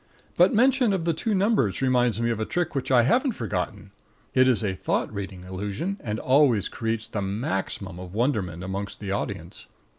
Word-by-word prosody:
But - - +5
mention 250 -1 +4
of 175 -4 -1
the 170 - +2
two 210 +7 -1
numbers 190 - +2
reminds 125 -3 +2
me 115 0 +1
of 115 - -2
a - - 0
trick 175 +5 -1
which 135 -2 -2
I 125 -2 +5
haven't 245 - +2
forgotten. 115 - -4 0.4
It 130 0 +5
is 125 -3 +2
a 100 -3 0
thought 95 - -1
reading 95 -3 -6
illusion, 100 - -4
and 105 -1 -2
always 130 -5 +3
creates 115 -1 -3
the 110 -2 -3
maximum 95 -2 -3
of 90 +1 -9
wonderment 105 - 0
amongst 100 +1 -5
the 100 -2 -4
audience. 95 -4 -4
115 Hz, 185 wpm, -25 LUFS, 100-145 Hz, 0.4 s, But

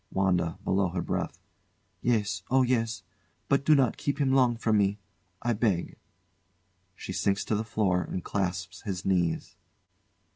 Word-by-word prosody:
WANDA. 90 -4 +1
[Below 95 0 +2
her 90 0 -2
breath] - - -2 0.6
Yes! 105 -4 +1
Oh, 130 0 +4
yes! 115 -5 0 0.4
But 140 -1 +2
do 155 +1 +6
not 130 -4 +2
keep 140 -1 -1
him 135 -2 +2
long 125 -3 +4
from 110 -2 +2
me 100 0 +2 0.5
I 120 - +2
beg! 105 -6 0 1.0
[She 95 - -6
sinks 100 +1 0
to - - -1
the 105 - 0
floor 100 -4 +1
and 90 - -4
clasps 90 -1 -3
his 95 -3 -4
knees. 90 -4 0
100 Hz, 150 wpm, -28 LUFS, 95-120 Hz, 1.0 s, do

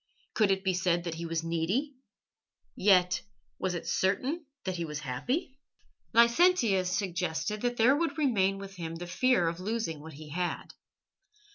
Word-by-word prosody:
Could 215 -3 +3
it 190 0 +1
be 190 -1 +1
said 175 -1 +1
that 170 -2 -3
he 165 +1 -5
was 165 0 -2
needy? 175 - -1 0.8
Yet 180 - +4 0.4
was 185 -1 -1
it 170 - -5
certain 265 - 0 0.2
that 185 -1 -3
he 170 - -2
was 150 -2 -5
happy? 255 - -3 0.5
Licentius 235 - +4
suggested 185 +2 -2
that 245 0 -1
there 245 +5 +5
would 330 +2 -1
remain 200 -10 +2
with 195 -1 -9
him 165 -1 -5
the 175 +1 -6
fear 250 -1 +2
of 165 +1 -2
losing 205 -5 -2
what 160 +1 -10
he 150 +2 -11
had. 175 +3 -3
190 Hz, 160 wpm, -30 LUFS, 170-235 Hz, 0.8 s, there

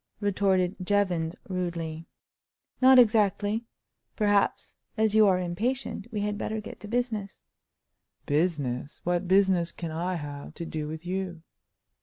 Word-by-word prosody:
retorted 195 -2 +1
Jevons, 180 -4 +1
rudely. 170 -3 -4 0.7
"Not 260 0 +8
exactly. 215 -1 +3 0.5
Perhaps, 205 -2 +1 0.2
as 220 -1 +2
you 215 -1 +6
are 185 -2 +4
impatient, 210 +6 -2
we 210 -2 -2
had 205 0 -2
better 220 0 -2
get 215 - -9
to 210 - -9
business." 225 -4 -2 0.8
"Business! 145 -4 -1
What 175 +1 0
business 190 -2 +3
can 170 -2 -6
I 175 +3 -2
have 145 -3 -7
to 170 - -5
do 155 -2 -4
with 160 +2 -7
you?" 180 -2 -3
185 Hz, 130 wpm, -27 LUFS, 170-210 Hz, 0.8 s, Not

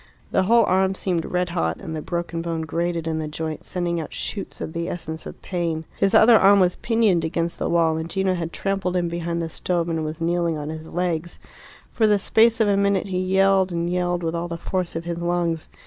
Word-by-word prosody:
The - - +3
whole 230 +5 +5
arm 190 +1 +2
seemed 175 -4 -1
red 180 -1 -1
hot, 80 - -1
and 160 - -6
the 155 - -4
broken 170 0 -3
bone 165 -1 -3
grated 170 +1 -2
in 160 -1 -1
the 155 - -3
joint, 155 0 -5
sending 175 -2 -2
out 155 - -8
shoots 200 - -5
of 160 - -5
the 170 0 -3
essence 160 -2 -6
of - - -10
pain. 165 -3 -2
His 195 - +3
other 230 0 +8
arm 200 +1 +6
was 180 -1 +3
pinioned 220 -7 +2
against 165 +1 -2
the - - -1
wall, 165 -2 +2
and 160 +1 -4
Gino 190 +1 +1
had 165 -2 -3
trampled 195 -1 -2
in 175 -1 +1
behind 170 0 -2
the - - -2
stove 170 +1 -1
and 165 -1 -1
was 155 +1 -5
kneeling 170 -1 0
on 150 0 -5
his 160 0 -7
legs. 175 -1 -2 0.5
For 220 - +2
the 210 -1 +4
space 225 +3 +3
of 220 - +3
a 200 - +3
minute 200 -1 +1
he 185 -1 -1
yelled 190 0 +3
and 170 0 -1
yelled 175 0 -1
with 165 0 -1
all 170 +1 -2
the 170 -1 -5
force 180 0 -3
of 165 +1 -4
his 170 0 -3
lungs. 170 -2 -1
175 Hz, 230 wpm, -23 LUFS, 165-190 Hz, 0.5 s, other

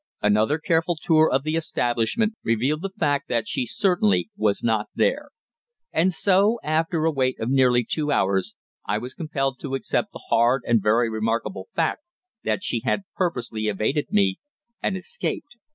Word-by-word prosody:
Another 105 +7 +3
careful 165 +2 +1
tour 155 0 +4
of 135 +1 +1
the 155 +1 -1
establishment 155 - 0
revealed 130 +7 0
the 195 - -3
fact 145 -6 -1
that 115 -2 0
she 125 - -2
certainly 110 - +1
was 105 -2 0
not 110 -2 +1
there. - - +1 0.6
And 185 +3 +2
so, 200 +5 +3
after 160 +1 0
a 160 - +3
wait 130 -3 0
of 115 +3 -2
nearly 125 -3 +4
two 150 -2 -1
hours, 95 -1 +1 0.3
I 105 - -1
was 125 +4 -6
compelled 135 -5 -2
to 135 -1 -4
accept 135 - -1
the - - -11
hard 120 +3 +3
and 115 -2 +3
very 115 +4 +3
remarkable 115 - -2
fact - - 0 0.4
that - - -1
she 115 - -1
had 200 - 0
purposely 125 - -2
evaded 110 +8 0
me, 95 -2 +2 0.4
and 190 - -1
escaped! 290 - -4
135 Hz, 165 wpm, -24 LUFS, 115-160 Hz, 0.6 s, tour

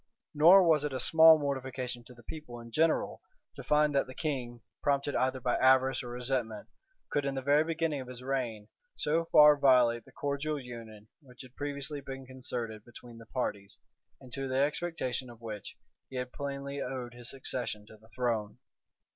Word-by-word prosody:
Nor 170 +6 +8
was 160 -4 +4
it 150 -2 -2
a 130 - -2
small 160 +4 +7
mortification 130 -4 -3
to 125 - -14
the 120 - -17
people 135 -3 -8
in 115 0 -11
general, 160 +5 +1 0.3
to - - -9
find 150 0 +2
that 140 -1 +1
the 130 - -10
king, 125 -6 -3 0.2
prompted 140 0 0
either 130 0 +1
by 125 0 0
avarice 130 0 +4
or 125 - -8
resentment 120 -3 -3 0.4
could, 145 - +1
in 140 0 -2
the 135 - -2
very 145 +3 +4
beginning 160 -3 -1
of 130 - -9
his 125 0 -8
reign, 120 -6 -3 0.3
so 160 +3 0
far 150 -2 +7
violate 125 -4 +4
the - - -17
cordial 145 +1 -2
union 115 -4 -10
which 130 -2 -13
had 130 0 -16
previously 145 0 -4
been 135 -1 -8
concerted 120 -4 -5
between 120 0 -13
the 115 - -14
parties, 100 -6 -4 0.4
and 130 -3 -14
to 135 -1 -3
the 130 0 -1
expectation 140 -3 -1
of 120 -1 -13
which 110 -3 -7 0.3
he 130 - -10
had 125 0 -4
plainly 140 0 -5
owed 125 -2 -5
his 120 0 -7
succession 125 -5 -4
to 110 - -15
the 110 +1 -22
throne. 115 -4 -2
130 Hz, 185 wpm, -31 LUFS, 120-145 Hz, 0.4 s, Nor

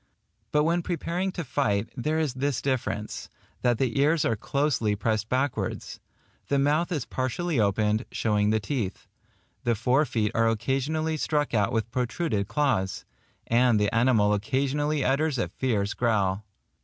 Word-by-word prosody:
But 150 0 +3
when 170 +2 +2
preparing 175 +2 -2
to 175 - -3
fight, 115 -7 0
there 150 +5 -1
is 155 -5 0
this 135 0 -1
difference, 120 -6 -3 0.3
that 120 -2 +2
the 130 0 0
ears 150 +2 +3
are 115 - +2
closely 125 -3 0
pressed 110 +1 -1
backwards; 135 +3 -2 0.5
the 140 - +1
mouth 150 +5 +2
is 150 -8 -1
partially 130 +4 -1
opened, 105 +2 +1
showing 105 -2 +1
the 110 0 +2
teeth; 105 -4 -3 0.6
the 120 -2 +2
fore 125 +7 +2
feet 110 -6 0
are 115 0 +3
occasionally 135 +8 -1
struck 150 -2 0
out 105 -3 +2
with 115 0 -1
protruded 125 - -1
claws; 115 -7 0 0.4
and 120 -1 +3
the 105 -1 +1
animal 115 -3 +3
occasionally 140 +7 0
utters 140 +1 +1
a - - -1
fierce 105 -6 -1
growl. 105 -4 0
125 Hz, 150 wpm, -26 LUFS, 110-145 Hz, 0.6 s, But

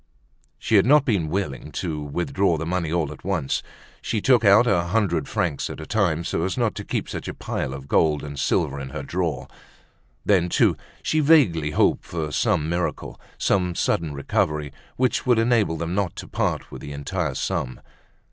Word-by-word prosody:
She 110 - +2
had 95 - +5
not 145 0 +6
been 95 - +1
willing 75 -7 -3
to 80 -4 -3
withdraw 85 +4 0
the 80 - -4
money 85 -2 -1
all 80 -4 0
at 75 - -11
once. 90 -8 -1 0.4
She 110 - -1
took 120 +1 +4
it - - +4
out 105 +5 +7
a 90 -7 +2
hundred 85 -6 0
francs 70 - -1
at - - -7
a 80 - -7
time, 85 -6 +1
so 80 - -2
as 95 - -2
not 120 -3 +1
to - - -6
keep - - -3
such - - -6
a - - -5
pile - - -3
of 70 0 -8
gold 75 0 +2
and 70 -1 -6
silver 70 +1 0
in 65 -1 -6
her 70 - -6
drawer; 75 -4 -2 0.8
then, 90 -4 +3
too, - - +3 0.3
she 155 - +1
vaguely 135 - +4
hoped 75 - +2
for 80 -3 -4
some 75 0 +1
miracle, 85 +1 -3 0.2
some 90 -2 +1
sudden 80 -1 0
recovery, 75 +1 -1 0.2
which 130 0 +1
would 120 -2 +5
enable 115 -8 +2
them 85 +1 -3
not 95 -2 -1
to - - -8
part - - -2
with - - -8
the 70 - -7
entire 75 +1 -3
sum. 65 -1 -2
85 Hz, 195 wpm, -24 LUFS, 75-100 Hz, 0.8 s, out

